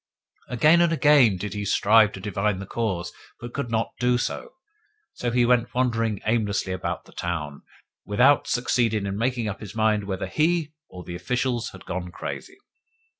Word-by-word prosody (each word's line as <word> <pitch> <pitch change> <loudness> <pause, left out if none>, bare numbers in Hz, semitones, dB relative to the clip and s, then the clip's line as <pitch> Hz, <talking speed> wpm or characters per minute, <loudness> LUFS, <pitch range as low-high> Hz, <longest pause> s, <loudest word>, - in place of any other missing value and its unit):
Again 150 +8 +4
and 170 -1 +3
again 145 - +5
did 100 +2 -5
he 105 -1 -3
strive 105 +1 +4
to - - -7
divine 105 0 -1
the 100 - -6
cause, 95 -6 -3 0.3
but 120 0 -8
could 140 -4 -3
not 115 0 -1
do 125 0 +2
so; 475 - -4 0.6
so 120 - -3
he 120 0 +3
went 125 0 +2
wandering 115 -5 0
aimlessly 105 -4 0
about 90 - -4
the - - -17
town, 75 -5 -4 0.4
without 125 +6 +3
succeeding 115 -4 +1
in 100 0 -3
making 120 +1 -1
up 105 - -4
his 105 -1 -9
mind 110 -2 +1
whether 95 0 -3
he 160 -1 0 0.2
or 90 -1 -10
the 85 - -8
officials 120 +6 -1
had 95 - -13
gone 90 0 -4
crazy. 375 - -7
115 Hz, 175 wpm, -24 LUFS, 100-125 Hz, 0.6 s, again